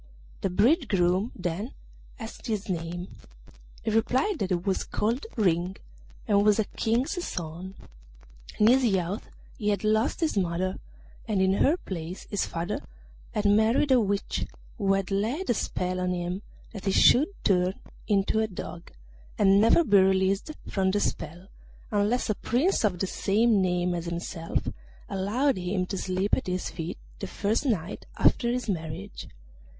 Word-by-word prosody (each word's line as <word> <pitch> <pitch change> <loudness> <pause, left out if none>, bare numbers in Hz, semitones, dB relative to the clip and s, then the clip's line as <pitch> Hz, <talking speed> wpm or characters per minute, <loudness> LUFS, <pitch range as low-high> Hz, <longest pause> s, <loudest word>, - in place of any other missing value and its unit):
The 195 - 0
bridegroom 205 - +2
then 185 +6 -4 0.4
asked 225 -3 -8
his 215 -3 -2
name; 175 0 -4 0.7
he 220 - 0
replied 260 - +1
that 190 - -1
he 185 - +2
was 185 +2 -1
called 235 - -1
Ring, 180 -2 +1 0.5
and 205 -2 +4
was 210 -1 +4
a 220 - +3
King's 245 - -1
son. 175 - -5 0.8
In 210 - +4
his 255 +4 +6
youth 195 -3 0 0.3
he 210 - 0
had 205 -1 0
lost 220 +9 +1
his 320 -6 +1
mother, 185 0 -1 0.5
and 210 -3 +1
in 190 0 +3
her 285 - +3
place 180 - -6
his 205 - 0
father 170 +1 -3 0.6
had 210 - 0
married 220 +7 +4
a 255 - +6
witch, 200 -1 -1 0.3
who 195 -2 +3
had 195 0 -1
laid 235 - 0
a - - +4
spell 185 -3 -2
on 180 0 0
him 180 +2 -3 0.3
that 200 -3 -8
he 195 - +2
should 260 +9 +6 0.2
turn 185 0 +2 0.3
into 205 +1 +2
a 220 - +2
dog, 175 -3 -8 0.5
and 195 0 +5
never 230 +10 +5
be 205 -9 +5
released 190 +5 +2 0.2
from 190 -1 +1
the 205 +2 +1
spell 175 -1 -3 0.4
unless 210 +4 +1
a 215 - +2
Prince 255 - +1
of 195 -4 +2
the 195 - 0
same 210 +3 +2
name 180 -1 +1
as 170 -1 -3
himself 170 0 -3 0.4
allowed 225 +8 0
him 185 +1 -1
to 195 - -4
sleep 190 +1 0
at - - -4
his 180 0 -2
feet 165 0 -5 0.2
the 195 - -4
first 215 +9 -1
night 195 -6 -2
after 235 - +3
his 250 0 -2
marriage. 170 +1 -4
195 Hz, 160 wpm, -27 LUFS, 180-220 Hz, 0.8 s, his